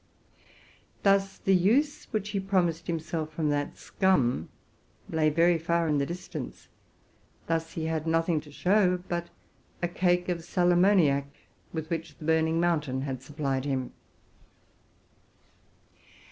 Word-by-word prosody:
Thus 195 -1 +3
the 195 - +1
use 235 - +2
to - - -31
which 210 -3 -2
he 200 - -1
hoped 175 -4 0
to 165 -1 -2
turn 155 0 -2
that 145 0 -1
scum 135 - +1 0.6
lay 155 -1 +2
very 165 +2 +3
far 170 +1 +1
in 150 -2 +2
the 140 - 0
dis 175 +2 -6
tance: - - -7 0.8
thus 165 0 -2
he 160 - -3
had 160 0 -2
nothing 165 -1 +1
to 150 - -15
show 180 +2 +2
but 175 0 -3 0.5
a - - +3
cake 180 0 +1
of 175 -2 -2
sal 175 +1 +2
ammo 185 +4 +5
niac, 140 -6 +3 0.5
with 160 -1 -5
which 165 -1 -4
the 155 - -9
Burning 160 0 +2
Mountain 150 -6 0
had 135 -2 -4
supplied 135 -1 -2
him. 130 -3 -2
165 Hz, 145 wpm, -28 LUFS, 155-180 Hz, 0.8 s, ammo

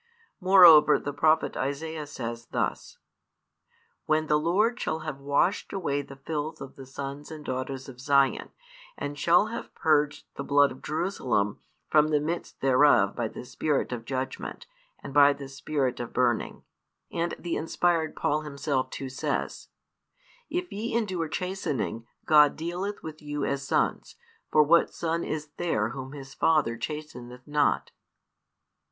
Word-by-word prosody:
Moreover 175 -6 +8
the 145 - -5
prophet 155 +3 +2
Isaiah 150 +3 -3
says 115 -4 -6
thus: - - -3 1.1
When 155 0 +2
the 150 0 +2
Lord 210 +10 +1
shall 160 0 -2
have 155 -3 -5
washed 145 +8 +1
away 145 -7 -1
the 140 -1 -11
filth 150 +3 -4
of 135 - -9
the 135 -1 -11
sons 140 +2 -7
and 155 -2 -9
daughters 130 +1 -4
of 130 -2 -11
Zion, 140 -1 +2 0.5
and 145 - -4
shall 175 +8 +3
have - - -7
purged 150 -2 +1
the 140 - -4
blood 145 0 +4
of 130 - -11
Jerusalem 130 - -1 0.3
from 150 0 +4
the 150 -1 +2
midst 165 +4 -4
thereof 130 -7 +4
by 120 -2 -1
the 115 - -9
spirit 145 +2 -1
of 115 -2 -5
judgment, 130 - -4 0.4
and - - -7
by 145 0 +7
the 140 -1 -9
spirit 135 -1 -2
of 120 -1 -6
burning. 120 -2 0 0.5
And 170 0 -2
the 175 - -3
inspired 165 0 0
Paul 150 +1 0
himself 140 -3 -2
too 135 - -6
says: 130 - -3 0.8
If 355 0 -3
ye 225 +3 -3
endure 185 -8 -1
chastening, 155 - -3 0.2
God 150 -3 +6
dealeth 180 +5 -4
with 155 0 -8
you 145 -1 -3
as 140 0 -1
sons, - - 0 0.4
for 155 - +6
what 170 +3 +4
son 165 0 -2
is 155 -1 -4
there 110 -11 0
whom 130 +2 -7
his 135 -2 -9
father 150 -8 +2
chasteneth 125 -2 -7
not? 150 -1 +1
150 Hz, 150 wpm, -27 LUFS, 135-160 Hz, 1.1 s, Moreover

